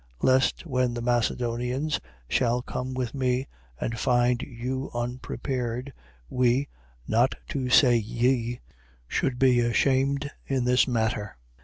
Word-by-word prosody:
Lest, 130 +5 +3
when 125 -5 0
the 120 - -3
Macedonians 125 +4 0 0.3
shall 120 - +1
come 130 +1 -4
with 125 -3 -2
me 130 -1 0 0.3
and 115 0 -3
find 125 -1 +2
you 130 +2 -4
unprepared, 125 +1 -3 0.3
we 125 - +2 0.4
(not 120 +4 +2
to 130 -2 -2
say 125 -1 +6
ye) 120 +2 0 0.5
should 125 - -1
be 125 -1 +4
ashamed 135 +4 +1 0.2
in 135 -2 0
this 125 +2 +4
matter. 110 - -1
125 Hz, 120 wpm, -26 LUFS, 120-130 Hz, 0.5 s, say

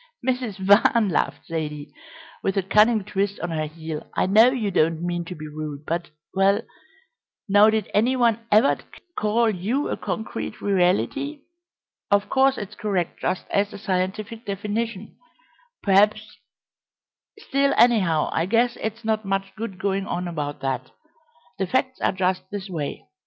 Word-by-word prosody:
"Mrs. 250 -6 -1
Van," 200 +3 +4
laughed 165 - -1
Zaidie, 150 -3 -4 0.5
with 195 0 -1
a 195 - +2
cunning 215 +3 +4
twist 200 0 -2
on 175 - -3
her 155 -1 -1
heel, 160 0 -7
"I - - +2
know 215 +6 +6
you 235 -6 -1
don't 165 -1 +1
mean 175 -1 -2
to 180 - -7
be 155 0 -8
rude, 150 -1 -6
but 170 +1 -2 0.2
well, 195 +3 +3 0.8
now 205 +2 +6
did 220 -2 0
any 235 +5 +3
one 235 -3 +3
ever 215 +6 +5 0.4
call 220 +2 +2
you 215 +10 -1
a - - -2
concrete 210 +2 -4
reality? 205 - 0 0.7
Of 200 0 +2
course 270 0 +3
it's 205 0 -6
correct 195 -5 -2
just 185 - -2
as 200 +1 +1
a - - -7
scientific 200 +3 -2
definition, 210 +1 -4 0.7
perhaps 210 +2 +3 1.0
still, 280 -10 +1
anyhow, 190 -10 +4
I 165 - 0
guess 235 +3 +2
it's 220 +1 -4
not 220 -1 0
much 195 0 -2
good 215 -4 -5
going 195 0 -1
on 180 0 -2
about 150 -4 -4
that. 135 -2 -2 0.7
The 190 - 0
facts 260 +4 -1
are - - +2
just 185 -1 -1
this 200 -1 -6
way. 150 -5 -4
200 Hz, 150 wpm, -24 LUFS, 180-220 Hz, 1.0 s, know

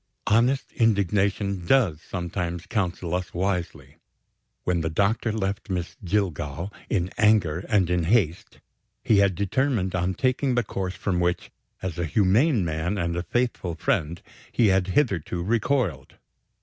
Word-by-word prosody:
Honest 120 +6 +2
indignation 100 -3 +1
does 100 - +3
sometimes 85 -1 -4
counsel 90 -4 -2
us 90 -1 -3
wisely. 90 -1 -3 0.7
When 90 -2 0
the 80 - -1
doctor 105 +7 +1
left 100 -1 -3
Miss 90 -2 -3
Jillgall, 90 -2 -2 0.2
in 95 -4 0
anger 105 -8 +3
and 100 -6 +3
in 90 -1 0
haste, 90 -4 0 0.4
he 105 - +4
had 100 -2 +3
determined 100 0 0
on 90 +1 0
taking 130 0 +1
the 120 - +2
course 95 -2 -4
from 95 -3 -1
which, 90 0 -1 0.3
as 90 -2 -4
a 85 - 0
humane 105 - +3
man 80 +5 -2
and 85 -2 -1
a 85 - -1
faithful 120 -5 -1
friend, 80 +1 -1 0.3
he 115 -4 +3
had 95 -1 +2
hitherto 95 - 0
recoiled. 110 - 0
95 Hz, 140 wpm, -25 LUFS, 85-110 Hz, 0.7 s, he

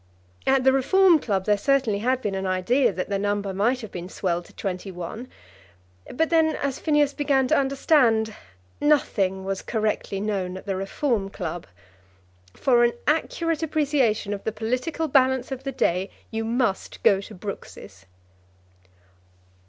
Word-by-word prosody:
At 265 -1 +4
the 265 0 +5
Reform 340 +6 +5
Club 195 -7 -1
there 210 -1 +2
certainly 265 -6 +1
had 255 +4 0
been 205 - -1
an 190 0 -2
idea 230 +7 +2
that 185 +1 -4
the 200 -1 -1
number 205 -1 -1
might 235 +7 +1
have 220 - -8
been 180 0 -7
swelled 175 -3 -2
to - - -18
twenty 190 0 -4
one; 180 +7 -7 0.8
but 320 +5 0
then, 320 -1 +3
as 275 -2 -3
Phineas 295 -2 +2
began 275 -3 +1
to - - +4
understand, 265 -5 +2 0.5
nothing 195 -10 +1
was 195 0 -2
correctly 215 -3 -2
known 195 -3 -2
at - - -11
the 195 -2 -2
Reform 195 +2 -1
Club. 175 -4 -5 0.9
For 240 -3 +3
an 240 0 +3
accurate 325 +1 0
appreciation 280 -10 +1
of 200 - -6
the 220 - -1
political 250 +9 -2
balance 260 -2 +2
of 265 0 -6
the 275 - -2
day, 185 -5 0 0.2
you 225 0 -2
must 230 -3 -1
go 195 -1 +4
to 210 +2 -11
Brooks's. 100 - -9
225 Hz, 155 wpm, -24 LUFS, 195-270 Hz, 0.9 s, the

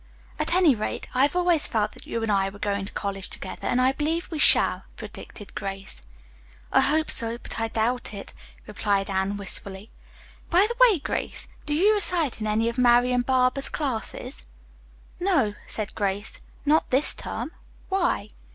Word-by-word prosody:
"At - - +2
any 355 -6 +5
rate, 215 -2 -4
I 255 - +2
have 285 +5 +3
always 350 -3 +4
felt 215 -2 0
that - - -11
you 230 - -3
and 220 - 0
I 195 -1 +2
were 200 - -12
going 200 -1 -2
to 200 - -9
college 195 -2 -3
together, 185 - -6
and 250 - +1
I 255 +1 +4
believe 320 +6 -2
we 315 - -3
shall," - - +5
predicted 205 -3 -9
Grace. 195 - -3 0.7
"I - - +5
hope 310 +2 +2
so, 230 -1 +3
but 240 - -7
I 225 - 0
doubt 230 +3 -1
it," 200 -2 -8 0.3
replied 200 -2 -1
Anne 190 +1 -1
wistfully. 195 +1 -1 0.6
"By 360 +4 +5
the 475 - -4
way, 405 - +2
Grace, 285 - -3 0.2
do 295 - 0
you 400 +7 +4
recite 340 - +1
in 215 - -1
any 220 +2 +1
of 235 +2 -2
Marian 245 0 +4
Barber's 255 +1 +2
classes?" 260 -1 -4 0.7
"No," 335 - +2
said 215 -1 -3
Grace, 200 +1 -2 0.2
"not 305 +2 +3
this 265 +4 +3
term. - - -5 0.4
Why?" 355 - 0
240 Hz, 170 wpm, -25 LUFS, 205-300 Hz, 0.7 s, any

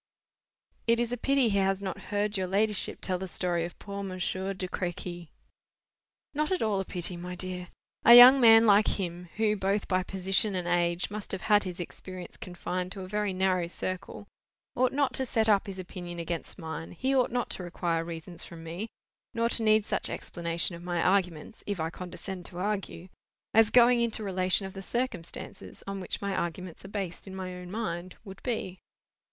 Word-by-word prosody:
"It 230 0 +4
is 240 0 0
a - - 0
pity 270 0 +2
he 200 -1 +2
has 195 0 +2
not 195 -2 -5
heard 205 +1 0
your 190 -2 0
ladyship 205 +2 +1
tell 185 -2 -1
the 190 - -4
story 175 -2 -1
of 175 - -9
poor 200 -1 -6
Monsieur 190 0 -2
de 185 0 -3
Crequy." 175 -2 -4 1.0
"Not 300 +3 0
at 370 - +1
all 210 -3 +1
a 195 - -2
pity, 180 0 -3
my 180 +1 -6
dear. 180 0 -5 0.4
A 235 - +10
young 255 +2 +11
man 225 -1 +8
like 210 0 +6
him, 175 -2 -4
who, 215 -1 +2
both 200 +1 0
by 185 -1 +2
position 195 +2 +1
and 180 -1 -2
age, 175 +1 +1
must 210 -1 -6
have 190 - -3
had 210 -2 +4
his 180 -1 -5
experience 180 +1 -8
confined 180 0 -4
to 195 - -7
a 185 - -6
very 210 0 -1
narrow 185 -2 +1
circle, 185 +3 -5 0.5
ought 255 0 +3
not 280 -1 +1
to 265 - 0
set 225 -3 +1
up 205 -1 +4
his 195 -1 -6
opinion 175 -1 -7
against 170 0 -4
mine; 160 -2 -6
he 260 +10 0
ought 255 -2 +3
not 245 0 -2
to 185 - -4
require 170 -1 -1
reasons 170 +1 -7
from 165 -1 -10
me, 175 +7 -5 0.5
nor 230 0 +2
to 235 - 0
need 215 -1 +4
such - - -1
explanation 170 0 -2
of 170 - -10
my 175 -1 -2
arguments 180 +1 0
(if 205 -3 -2
I 160 +1 -1
condescend 180 +1 -6
to 175 - -11
argue), 190 -2 -3 0.4
as 225 -1 +6
going 245 0 +6
into 225 -2 -1
relation 185 0 +2
of 190 - -7
the 195 - -7
circumstances 195 -6 -4
on 195 0 -4
which 185 - -4
my 200 -1 -1
arguments 175 0 -4
are - - -8
based 195 -3 -5
in 190 - -7
my 185 -1 -5
own 180 0 -8
mind, 185 -4 -4
would 195 -2 -10
be." 190 -7 -3
190 Hz, 195 wpm, -29 LUFS, 175-210 Hz, 1.0 s, young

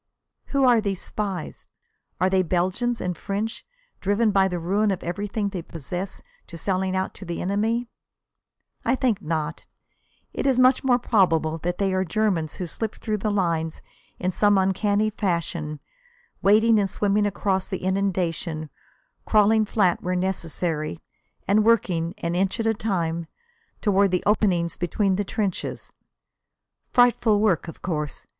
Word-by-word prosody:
Who 275 -1 0
are 240 -3 +5
these 195 -3 -2
spies? 195 -6 -5 0.5
Are 185 - +3
they 190 0 +3
Belgians 185 +7 0
and 180 -1 -2
French, 205 +6 -3 0.4
driven 205 +3 +2
by 195 -1 +4
the 180 -2 -3
ruin 195 +5 +1
of 190 -2 -2
everything 200 +4 -2
they 190 -3 -5
possess 175 +4 -6 0.2
to 170 - -9
selling 190 +2 -1
out 190 0 -1
to - - -7
the 170 -2 -4
enemy? 220 +5 0 1.0
I - - +2
think 250 -6 0
not. 155 0 -3 0.7
It - - -1
is 265 -2 +3
much 255 +1 +5
more 255 -2 +4
probable 165 -9 +2
that 175 +2 -2
they 195 -1 0
are 185 0 +1
Germans 180 -4 0
who 180 - -4
slip 215 +5 -4
through 215 -2 -3
the 215 - -1
lines 170 -5 -1 0.3
in 185 0 -1
some 205 +2 +3
uncanny 205 +3 +1
fashion, 170 -6 -2 0.6
wading 220 +2 +5
and 195 -1 +1
swimming 205 +1 +1
across 195 -1 -1
the 190 -3 -4
inundation, 180 -5 -1 0.6
crawling 215 0 +4
flat 195 -4 +1
where 180 +1 -1
necessary, 165 - -2 0.5
and 210 +2 +4
working, 185 -6 +2
an 170 0 -2
inch 190 +5 0
at 225 - 0
a 225 - +3
time, 170 -6 -2 0.5
toward 200 -2 +3
the 180 -1 0
openings 185 -5 +2
between 190 +2 0
the 205 - 0
trenches. 200 -1 -3 1.0
Frightful 240 -3 +4
work, 200 -6 +2
of 165 - -10
course. 150 -5 -3
190 Hz, 150 wpm, -24 LUFS, 175-210 Hz, 1.0 s, are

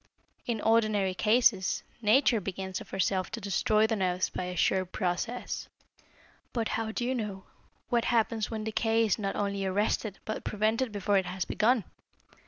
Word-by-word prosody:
In 230 -3 -1
ordinary 215 -4 +2
cases 215 -1 +3 0.2
Nature 230 +1 +4
begins 190 0 -4
of - - -11
herself 190 -1 0
to 230 - -3
destroy 215 +1 +2
the 220 0 +1
nerves 185 -2 0
by 185 - -3
a 180 0 -5
sure 185 +2 +2
process. 185 +6 -3 0.8
But 230 -3 -1
how 225 0 -2
do 240 - -2
you 255 - 0
know 210 -6 -4 0.5
what 240 -2 +2
happens 225 -2 +1
when 220 -2 -4
decay 225 +1 +1
is 215 0 +1
not 195 -2 -2
only 200 -1 -1
arrested 205 +1 0
but 215 - -4
prevented 220 +4 0
before 205 -1 +2
it 190 - -4
has 185 0 -3
begun? 230 0 +2
215 Hz, 165 wpm, -29 LUFS, 190-225 Hz, 0.8 s, Nature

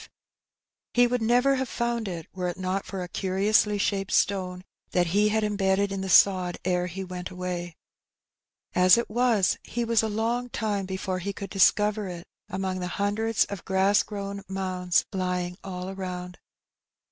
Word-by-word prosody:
He 245 0 +6
would 245 0 0
never 245 +4 +3
have 260 -2 -2
found 235 -2 -1
it, 170 -4 -5
were 180 -1 -2
it 175 - -4
not 185 +1 -2
for 190 -2 -4
a - - -6
curiously 205 +3 +2
shaped 200 0 -1
stone 185 -2 +1 0.3
that 180 -1 +3
he 210 +1 +4
had 220 +1 +1
embedded 200 -1 +1
in 195 -1 -3
the 190 - -4
sod 185 -1 +5
ere 180 -1 +1
he 190 +2 -5
went 180 -1 -6
away. 180 -2 -5 1.0
As 180 +3 +6
it 235 - -2
was, 230 -4 +2
he 240 +1 -3
was 230 -1 +3
a 220 - -1
long 230 +3 -1
time 205 -4 -2
before 190 0 -3
he 200 +3 -4
could 200 - -7
discover 210 +1 +3
it 175 -1 -7 0.2
among 190 -1 -2
the 180 - -3
hundreds 210 +2 +1
of 200 -3 -7
grass 190 +1 +3
grown 200 -1 -5
mounds 185 -2 0
lying 180 -1 -2
all 185 -1 -5
around 180 -2 -5
it. - - -22
195 Hz, 170 wpm, -26 LUFS, 180-210 Hz, 1.0 s, He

